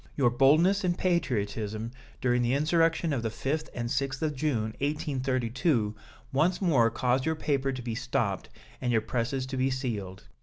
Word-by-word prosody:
Your 125 -4 +3
boldness 155 - +4
and 175 -1 +1
patriotism 110 - -1 0.3
during 125 -1 +2
the 120 +2 +2
insurrection 165 +1 +2
of 125 - -1
the 115 - -1
5th 145 +7 -2
and 120 -1 -2
6th 135 +3 -1
of 150 -2 0
June, 120 -7 -1
1832, 130 -4 0 0.4
once 165 +7 +2
more 140 - +4
caused 125 +3 +1
your 160 - +1
paper 135 -3 0
to 130 -1 -5
be 115 -1 -3
stopped 120 +2 -1 0.3
and 125 - 0
your 115 - +4
presses 130 +3 -2
to 130 0 -5
be 130 +1 +2
sealed. 110 -8 -4
130 Hz, 165 wpm, -28 LUFS, 120-150 Hz, 0.4 s, boldness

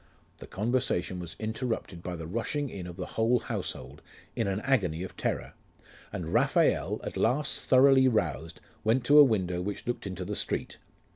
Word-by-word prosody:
The - - -10
conversation 105 -5 -1
was 85 -2 -7
interrupted 110 -5 -3
by 90 0 -5
the 80 -1 -7
rushing 115 - -2
in 90 -3 -6
of 90 - -8
the - - -4
whole 115 +2 +2
household, 70 - -5 0.3
in 115 - 0
an 95 0 -1
agony 95 - +1
of 95 - -8
terror; - - -3 0.6
and 85 -3 -5
Raphael, - - +2
at - - -5
last 145 +3 +1
thoroughly 130 0 +6
roused, 85 - -1 0.2
went 115 +3 +2
to 145 +3 +7
a - - +11
window 95 -8 +1
which 100 +3 -5
looked 120 -4 -3
into 90 -1 -5
the 105 +2 -3
street. - - -2
105 Hz, 170 wpm, -29 LUFS, 90-125 Hz, 0.6 s, a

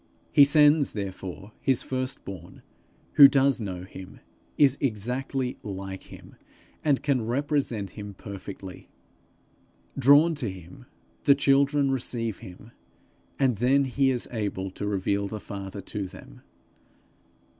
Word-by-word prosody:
He 140 - +7
sends 150 0 +4
therefore 95 0 -6
his 130 -3 +1
first 130 0 -3
born, 95 -1 -10 0.5
who 140 - +12
does 135 -2 +2
know 90 -4 -5
him, 95 0 -11 0.4
is 140 -3 +5
exactly 125 +2 -2
like 95 -1 -7
him, - - -14 0.5
and 145 -3 +1
can 140 -5 +1
represent 125 - -1
him 105 -2 -9
perfectly. 100 -1 -9 1.1
Drawn 145 +5 +5
to 140 -8 -2
him, 95 +6 -12 0.4
the 140 - +6
children 140 0 +3
receive 115 -4 -2
him, 105 +2 -12 0.7
and 130 -5 +2
then 130 +5 +3
he 135 +1 +1
is 125 -2 -1
able 100 -4 -3
to 100 +2 -5
reveal 100 0 -1
the 105 +2 -6
Father 100 0 -7
to 100 -2 -5
them. 95 0 -14
115 Hz, 125 wpm, -26 LUFS, 100-135 Hz, 1.1 s, who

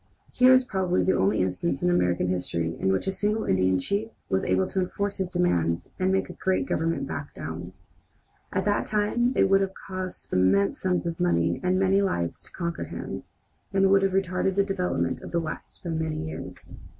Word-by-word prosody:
Here 255 0 +6
is 260 0 +6
probably 185 -5 0
the 190 - +2
only 95 0 +2
instance 135 - -1
in 180 - +3
American 90 - +2
history 85 -2 -1
in 95 - +2
which 95 - 0
a 190 - 0
single 210 +3 -1
Indian 95 0 +2
chief 200 - -1 0.2
was 95 - +1
able 95 0 +2
to 190 - -2
enforce 200 +2 -2
his 190 -2 -1
demands 85 - 0
and 185 0 +2
make 190 0 +1
a - - -8
great 185 -8 0
government 160 -2 -1
back 140 +1 -6
down. 85 +4 -6 0.8
At - - -1
that 205 0 +1
time 215 +4 +1
it - - +4
would 195 0 +4
have 190 0 -2
cost 185 -1 -6
immense 95 +2 +3
sums 180 -1 0
of 170 0 -3
money 85 - +2
and 180 0 +1
many 195 +1 +3
lives 85 - -1
to - - -10
conquer 170 -1 -3
him, - - -6 0.5
and 195 0 +4
would 195 0 +6
have 195 -1 +1
retarded 190 0 0
the 200 - +4
development 195 -2 -1
of - - -8
the 170 - 0
West 160 -2 -7
by 170 - -3
many 160 -1 -2
years. 155 - -9
175 Hz, 200 wpm, -26 LUFS, -, 0.8 s, Here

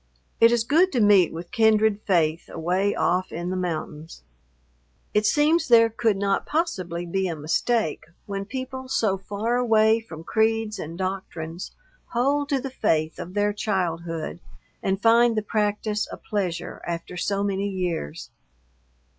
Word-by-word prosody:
It 230 0 +7
is 235 -1 +2
good 330 +10 +3
to 250 - +1
meet 205 -5 +5
with 170 +2 -8
kindred 220 -2 +3
faith 165 -4 +1
away 185 +5 0
off 185 +1 0
in 175 +2 -4
the - - -2
mountains. 160 - -5 0.9
It 210 0 +3
seems 310 +6 +3
there 230 -2 +6
could 220 -2 +1
not 195 0 0
possibly 185 - -2
be 190 +2 -1
a 170 - -3
mistake 160 +4 0 0.2
when 195 -1 -4
people 260 +2 -6
so 215 -7 +1
far 210 +5 -2
away 225 -2 +4
from 165 -8 -10
creeds 220 +1 0
and 165 +2 -6
doctrines 185 -3 -5 0.4
hold 280 +4 +1
to 275 - +1
the 270 0 -5
faith 155 -9 0
of 180 +3 -7
their 205 0 +2
childhood 170 - -2 0.4
and 190 0 0
find 230 +1 +4
the 215 - +1
practice 210 0 -1
a - - -6
pleasure 190 -6 -3
after 170 +1 -5
so 200 +3 -1
many 200 0 -1
years. 180 - -4
200 Hz, 150 wpm, -24 LUFS, 175-225 Hz, 0.9 s, It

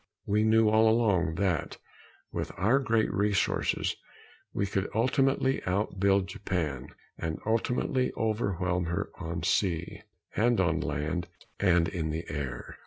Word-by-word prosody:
We 105 +1 +2
knew 110 0 +4
all 110 +1 +5
along 100 -8 +2
that, 90 -4 -1 0.5
with - - -3
our 115 +9 +3
greater 115 -6 +1
resources, 100 0 +1 0.6
we 100 - -1
could 100 0 -2
ultimately 135 +3 +2
out 95 +1 -1
build 100 0 +3
Japan 85 -9 -3 0.3
and 80 -1 -2
ultimately 125 +3 0
overwhelm 95 -5 0
her 85 0 -2
on 85 +1 -4
sea, 90 -4 0 0.3
and 120 +1 +3
on 85 -3 +2
land 75 +5 -2 0.3
and 90 -4 +3
in 80 -2 -3
the 80 +2 -3
air. 70 -5 -5
95 Hz, 130 wpm, -29 LUFS, 85-110 Hz, 0.6 s, all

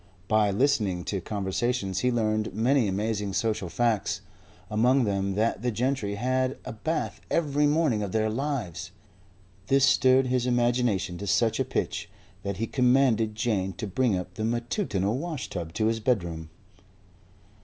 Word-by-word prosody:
By 110 -1 +3
listening 100 -5 +1
to 95 0 -3
conversations 100 +1 -1
he 125 +4 +1
learned 110 -3 0
many 120 +2 +3
amazing 105 0 -1
social 105 -4 -1
facts; 105 -1 0 0.5
among 125 +5 +3
them 100 -2 -1
that 110 0 0
the 125 - 0
gentry 120 -3 -1
had 130 +4 0
a 125 - -5
bath 160 +9 -3
every 150 -2 +2
morning 145 -7 +2
of 100 -2 -3
their 110 +1 +1
lives. 110 - -3 0.8
This 135 +2 +4
stirred 130 0 +4
his 125 -1 0
imagination 120 -7 +1
to 100 - -5
such 115 +3 +2
a - - +3
pitch - - -3 0.3
that 100 -2 -4
he 115 - -1
commanded 125 -4 +2
Jane 105 -4 -1
to 100 - -5
bring 105 +1 +1
up 90 0 -6
the 110 - -4
matutinal 120 - -1
washtub 130 - -5
to 110 - 0
his 115 0 +1
bedroom. 85 -9 -1
110 Hz, 150 wpm, -27 LUFS, 100-125 Hz, 0.8 s, This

